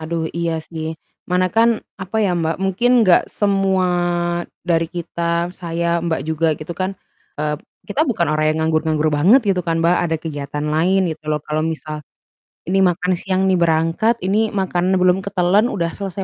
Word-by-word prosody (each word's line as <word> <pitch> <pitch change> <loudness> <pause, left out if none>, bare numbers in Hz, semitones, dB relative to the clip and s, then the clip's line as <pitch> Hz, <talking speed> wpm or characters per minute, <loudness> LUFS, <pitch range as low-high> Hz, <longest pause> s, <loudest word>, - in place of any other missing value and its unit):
Aduh 160 0 -2
iya 170 -1 -1
sih. 160 -1 -5 0.3
Mana 180 0 +3
kan 230 0 +3 0.2
apa 190 +4 -5
ya 195 -4 +2
Mbak, 165 -1 -1
mungkin 195 +6 +1 0.2
enggak 180 - +6
semua 195 -2 +1 0.8
dari 165 -2 +2
kita, 170 0 -2
saya, 170 -1 -1
Mbak 165 -2 -1
juga 160 +1 0
gitu 160 +2 -7
kan, 185 +1 -1 0.5
eee, 150 0 -1 0.3
kita 240 +9 +1
bukan 230 - 0
orang 155 0 +1
yang 155 - -3
nganggur-nganggur 155 -1 +1
banget 185 - +5
gitu 190 -2 +2
kan 165 -1 0
Mbak, 170 +2 +3
ada 165 -1 0
kegiatan 145 -2 -5
lain 175 +5 +2
gitu 160 -1 -6
loh. 150 0 0
Kalau 155 +1 -1
misal 155 -1 -4 0.7
ini 195 +1 +2
makan 180 +1 +1
siang 190 0 -1
nih 185 - +3
berangkat, 165 +7 +2
ini 210 +4 +2
makanan 185 -1 0
belum 180 +1 +4
ketelen 200 +2 +2
udah 170 -8 -1
selesai 195 -1 -4
170 Hz, 170 wpm, -19 LUFS, 160-190 Hz, 0.8 s, enggak